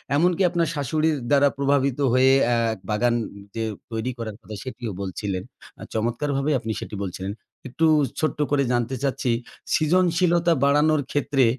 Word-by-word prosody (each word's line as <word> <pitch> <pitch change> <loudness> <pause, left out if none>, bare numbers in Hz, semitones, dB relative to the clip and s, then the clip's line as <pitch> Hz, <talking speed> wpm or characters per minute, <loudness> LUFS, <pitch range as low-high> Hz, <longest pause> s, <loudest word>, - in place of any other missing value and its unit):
এমনকি 175 +4 +2
আপনার 170 -2 0
শাশুড়ির 155 +2 0
দ্বারা 145 0 +5
প্রভাবিত 140 -1 +1
হয়ে 130 +1 +5
অ্যা 120 0 +2 0.3
বাগান 120 +3 +2 0.4
যে 115 - -1 0.3
তৈরি 115 +3 -2
করার 110 -3 -5
কথা 105 - -9
সেটিও 120 -4 -5
বলছিলেন। 95 0 -3 0.4
আ - - -6
চমৎকারভাবে 135 +6 -1
আপনি 110 0 -4
সেটি 105 - -7
বলছিলেন। 95 +1 -4 0.4
একটু 160 +6 0 0.3
ছোট্ট 155 -1 -1
করে 140 -1 +3
জানতে 120 +2 0
চাচ্ছি, 130 -2 0 0.4
সৃজনশীলতা 175 +1 +3
বাড়ানোর 150 +1 +4
ক্ষেত্রে 140 -2 +1
140 Hz, 140 wpm, -24 LUFS, 115-155 Hz, 0.4 s, দ্বারা